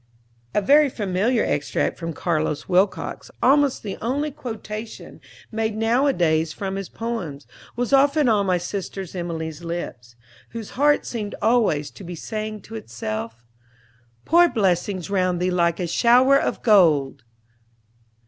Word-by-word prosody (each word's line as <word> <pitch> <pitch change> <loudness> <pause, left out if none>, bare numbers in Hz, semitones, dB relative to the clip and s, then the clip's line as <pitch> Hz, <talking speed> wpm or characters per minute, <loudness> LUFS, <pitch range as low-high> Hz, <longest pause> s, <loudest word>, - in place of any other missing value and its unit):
A 210 - +3
very 290 +6 +5
familiar 210 +2 0
extract 145 -1 -1
from 165 -1 -4
Carlos 155 -2 -2
Wilcox, 190 +2 0
almost 280 -1 +3
the 200 -3 -5
only 285 +6 -1
quotation 220 -3 -8 0.3
made 220 -1 -2
nowadays 220 - +2
from 195 +3 -4
his 195 -1 -5
poems, 190 -12 -5 0.3
was 245 +3 -2
often 280 +1 +4
on 205 -4 +2
my 180 -1 +2
sister 190 +2 -5
Emilie's 165 -3 -5
lips, 125 -8 -6 0.4
whose 225 -3 -7
heart 290 +2 +2
seemed 210 -4 -4
always 215 -11 +2
to - - -12
be 175 0 -7
saying 215 +3 -5
to 225 - -13
itself: 115 - -6 0.8
"Pour 345 +1 +5
blessings 190 - 0
round 185 -2 +1
thee 180 +1 0
like 170 -2 +1
a 180 - -1
shower 245 +9 +4
of - - -3
gold!" 155 - +4
200 Hz, 135 wpm, -23 LUFS, 170-235 Hz, 0.8 s, very